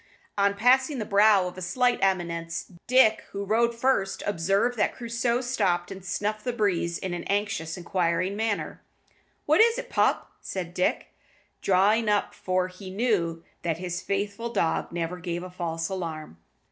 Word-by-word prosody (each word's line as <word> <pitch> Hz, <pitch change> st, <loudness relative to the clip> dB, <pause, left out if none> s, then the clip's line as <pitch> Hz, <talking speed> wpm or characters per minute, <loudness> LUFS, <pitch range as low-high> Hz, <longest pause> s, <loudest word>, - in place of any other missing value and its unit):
On 200 Hz, 0 st, +2 dB
passing 260 Hz, +6 st, +3 dB
the 220 Hz, -, -3 dB
brow 205 Hz, -1 st, +5 dB
of 180 Hz, +1 st, -7 dB
a -, -, -8 dB
slight 245 Hz, +8 st, +1 dB
eminence, 170 Hz, -3 st, -1 dB, 0.2 s
Dick, 250 Hz, -4 st, +5 dB
who 200 Hz, 0 st, -3 dB
rode 235 Hz, +3 st, +2 dB
first, 230 Hz, -5 st, 0 dB
observed 200 Hz, +6 st, +1 dB
that 210 Hz, -, 0 dB
Crusoe 235 Hz, 0 st, -1 dB
stopped 180 Hz, -9 st, 0 dB
and 195 Hz, -1 st, -8 dB
snuffed 205 Hz, +2 st, -2 dB
the 250 Hz, -, -1 dB
breeze 185 Hz, -7 st, 0 dB
in 185 Hz, -2 st, -4 dB
an 175 Hz, -, -4 dB
anxious, 200 Hz, -5 st, -1 dB
inquiring 180 Hz, +1 st, 0 dB
manner. 220 Hz, -1 st, -2 dB, 0.6 s
"What 310 Hz, +7 st, +5 dB
is't, 470 Hz, +2 st, +3 dB
pup?" -, -, +1 dB
said 175 Hz, -3 st, -5 dB
Dick, 180 Hz, -, -1 dB, 0.5 s
drawing 205 Hz, +4 st, +3 dB
up, 205 Hz, -1 st, +1 dB
for 185 Hz, 0 st, -1 dB
he 185 Hz, +1 st, -10 dB
knew 185 Hz, -6 st, 0 dB, 0.2 s
that 165 Hz, -2 st, -1 dB
his 175 Hz, 0 st, -4 dB
faithful 205 Hz, +4 st, -2 dB
dog 180 Hz, -7 st, 0 dB
never 170 Hz, +1 st, -3 dB
gave 175 Hz, 0 st, -4 dB
a 185 Hz, -, -8 dB
false 165 Hz, -2 st, -3 dB
alarm. 160 Hz, -, -5 dB
195 Hz, 160 wpm, -26 LUFS, 175-225 Hz, 0.6 s, brow